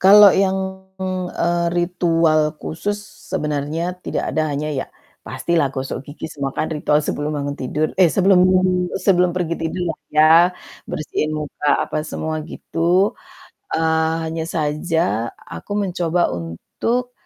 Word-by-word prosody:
Kalau 200 Hz, +1 st, +9 dB
yang, 190 Hz, 0 st, 0 dB, 0.4 s
eee, 170 Hz, 0 st, 0 dB
ritual 165 Hz, -3 st, +2 dB
khusus 205 Hz, +6 st, -3 dB, 0.4 s
sebenarnya 155 Hz, +1 st, -1 dB
tidak -, -, -2 dB
ada 155 Hz, -1 st, +1 dB
hanya 150 Hz, +2 st, -2 dB
ya, 135 Hz, -, -2 dB, 0.4 s
pastilah 165 Hz, -5 st, 0 dB
gosok 135 Hz, 0 st, -4 dB
gigi 145 Hz, +2 st, -9 dB
semua 140 Hz, -3 st, -4 dB
kan -, -, 0 dB
ritual 150 Hz, 0 st, +2 dB
sebelum 150 Hz, +1 st, -2 dB
bangun 145 Hz, 0 st, -3 dB
tidur, 150 Hz, +4 st, -1 dB
eh 180 Hz, -, +7 dB
sebelum 190 Hz, -1 st, +4 dB, 0.6 s
sebelum 180 Hz, -2 st, +3 dB
pergi 170 Hz, -2 st, 0 dB
tidur 165 Hz, +2 st, -2 dB
lah -, -, -17 dB
ya, 155 Hz, +1 st, +6 dB, 0.6 s
bersihin 155 Hz, 0 st, -2 dB
muka, 150 Hz, -1 st, -3 dB, 0.2 s
apa -, -, -2 dB
semua 160 Hz, 0 st, -3 dB
gitu. 175 Hz, +5 st, +1 dB, 0.6 s
Eee, 160 Hz, 0 st, +2 dB
hanya 160 Hz, 0 st, -3 dB
saja 155 Hz, -, -1 dB
aku -, -, -9 dB
mencoba 175 Hz, -2 st, 0 dB
untuk, 225 Hz, -, -3 dB
160 Hz, 130 wpm, -20 LUFS, 150-180 Hz, 0.6 s, Kalau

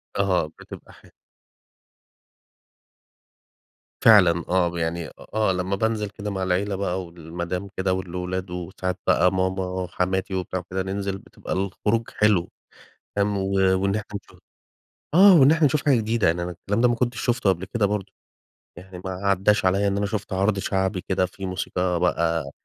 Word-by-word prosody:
أها 95 Hz, -4 st, +2 dB
بتبقى 80 Hz, -, -13 dB
ح -, -, -20 dB, 3.0 s
فعلًا 90 Hz, -7 st, +6 dB
آه، 90 Hz, -1 st, +2 dB
يعني 80 Hz, 0 st, -2 dB
أ -, -, -12 dB, 0.2 s
آه 110 Hz, -3 st, +2 dB
لما 90 Hz, +1 st, -1 dB
بانزل 110 Hz, 0 st, -1 dB
كده 105 Hz, 0 st, -6 dB
مع 95 Hz, -1 st, -3 dB
العيلة 95 Hz, +2 st, 0 dB
بقى، 95 Hz, -1 st, -2 dB
والمدام 85 Hz, +3 st, -5 dB
كده، 95 Hz, 0 st, +1 dB
والأولاد 90 Hz, 0 st, -4 dB
وساعات 90 Hz, +1 st, -4 dB
بقى 90 Hz, -, +4 dB
ماما، 95 Hz, -1 st, -1 dB
حماتي 95 Hz, +1 st, -1 dB
وبتاع 95 Hz, 0 st, -2 dB
وكده 95 Hz, +1 st, -4 dB
ننزل 95 Hz, 0 st, -3 dB
بتبقى -, -, -8 dB
الخروج 105 Hz, +4 st, -1 dB
حلو، 105 Hz, -5 st, +2 dB, 0.7 s
تمام، 100 Hz, 0 st, +1 dB
و 95 Hz, 0 st, -2 dB, 0.3 s
وإن 100 Hz, 0 st, +1 dB
إحنا 105 Hz, -1 st, -5 dB
نش -, -, -19 dB, 0.8 s
آه، 190 Hz, +2 st, +8 dB
وإن 135 Hz, +3 st, +7 dB
إحنا 160 Hz, -2 st, +4 dB
نشوف 150 Hz, +2 st, 0 dB
حاجة 145 Hz, -4 st, +4 dB
جديدة 115 Hz, 0 st, +1 dB
يعني 85 Hz, +2 st, +1 dB
أنا 90 Hz, -, -3 dB
الكلام 100 Hz, +5 st, -3 dB
ده 125 Hz, -, +5 dB
ما 120 Hz, -, +2 dB
كنتش 120 Hz, 0 st, -1 dB
شفته 120 Hz, -4 st, +1 dB
قبل 95 Hz, 0 st, -2 dB
كده 105 Hz, +1 st, 0 dB
برضو. 100 Hz, -1 st, -3 dB, 0.7 s
يعني 90 Hz, 0 st, -10 dB
ما 95 Hz, -, -3 dB
عداش 100 Hz, +1 st, +1 dB
عليَّ 100 Hz, +2 st, +2 dB
إن 100 Hz, 0 st, 0 dB
أنا 100 Hz, -, 0 dB
شُفت 100 Hz, -1 st, -4 dB
عرض 100 Hz, +2 st, +1 dB
شعبي 95 Hz, -1 st, -1 dB
كده 95 Hz, -1 st, 0 dB
فيه 95 Hz, +1 st, -8 dB
موسيقى 90 Hz, -1 st, -1 dB
بقى 85 Hz, -5 st, 0 dB
95 Hz, 160 wpm, -24 LUFS, 90-105 Hz, 3.0 s, آه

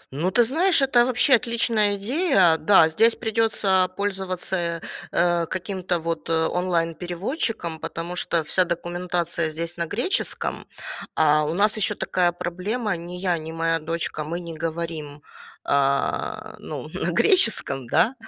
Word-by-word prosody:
Ну, 165 Hz, +6 st, 0 dB
ты 235 Hz, +5 st, +4 dB
знаешь, 320 Hz, +6 st, +3 dB
это 245 Hz, -3 st, +4 dB
вообще 255 Hz, +2 st, +3 dB
отличная 230 Hz, -3 st, +2 dB
идея. 200 Hz, -, +3 dB
Да, 160 Hz, -1 st, +5 dB
здесь 225 Hz, +8 st, +3 dB
придется 215 Hz, -5 st, +1 dB
пользоваться, 185 Hz, -3 st, -2 dB, 0.3 s
э, 170 Hz, 0 st, +2 dB
каким-то 185 Hz, -1 st, -2 dB
вот 165 Hz, 0 st, -4 dB
онлайн-переводчиком, 175 Hz, -, -1 dB
потому 170 Hz, +3 st, -5 dB
что 170 Hz, -2 st, 0 dB
вся 185 Hz, +4 st, +2 dB
документация 175 Hz, -1 st, -2 dB
здесь 165 Hz, +2 st, -5 dB
на 170 Hz, -1 st, -2 dB
греческом. 245 Hz, -, -2 dB, 0.5 s
А 155 Hz, -1 st, +3 dB
у 155 Hz, +2 st, -2 dB
нас 210 Hz, +3 st, +3 dB
еще 215 Hz, -, +1 dB
такая 175 Hz, -1 st, +1 dB
проблема: 190 Hz, +5 st, -3 dB
ни 170 Hz, +1 st, -8 dB
я, 180 Hz, -2 st, -1 dB
ни 160 Hz, +1 st, -7 dB
моя 165 Hz, 0 st, 0 dB
дочка, 165 Hz, 0 st, -3 dB
мы 165 Hz, +3 st, -4 dB
не 170 Hz, -2 st, -7 dB
говорим, 160 Hz, -3 st, -5 dB, 0.4 s
э, 140 Hz, 0 st, 0 dB
ну, -, -, -7 dB
на -, -, -3 dB
греческом, 220 Hz, -, +3 dB
да. 230 Hz, -, +3 dB
175 Hz, 135 wpm, -23 LUFS, 165-210 Hz, 0.5 s, Да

